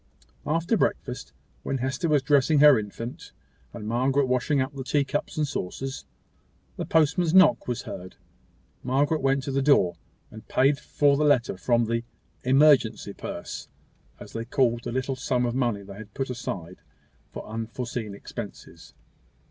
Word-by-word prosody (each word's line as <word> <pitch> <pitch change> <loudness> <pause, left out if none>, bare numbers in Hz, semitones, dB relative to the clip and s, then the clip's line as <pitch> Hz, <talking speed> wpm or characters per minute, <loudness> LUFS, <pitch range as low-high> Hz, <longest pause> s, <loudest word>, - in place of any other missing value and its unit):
After 165 +8 +1
breakfast, 125 -9 -2 0.3
when 135 - -2
Hester 130 +5 -2
was 145 -3 +3
dressing 145 +1 +3
her 145 -4 +7
infant, 110 +3 -7 0.4
and 110 -3 -7
Margaret 130 +4 +2
washing 130 +3 +1
up 130 +2 -1
the 135 -1 -6
tea 145 +2 +1
cups 145 +3 -3
and 150 -1 +1
saucers, 135 +4 -5 0.7
the - - -5
postman's 160 +2 +2
knock 190 +2 +6
was 125 -2 -3
heard. 90 +1 -8 0.7
Margaret 145 +5 +1
went 135 0 +1
to 140 - -3
the 135 +1 +1
door, 135 -11 +4 0.4
and 110 0 -12
paid 140 +2 +3
for 145 -2 +2
the 150 - +1
letter 130 -8 +3
from 120 +4 +1
the 115 +1 -1 0.4
"emergency 130 -6 +4
purse," - - -7 0.5
as - - -11
they 115 - -3
called 120 -2 +1
the - - -3
little 130 +2 -2
sum 125 -1 0
of 120 - -1
money 120 -6 0
they 100 0 -10
had 105 -1 -11
put 135 -1 -2
aside 95 -7 -6 0.5
for - - -8
unforeseen 115 -1 -5
expenses. - - -9
130 Hz, 155 wpm, -26 LUFS, 115-145 Hz, 0.7 s, her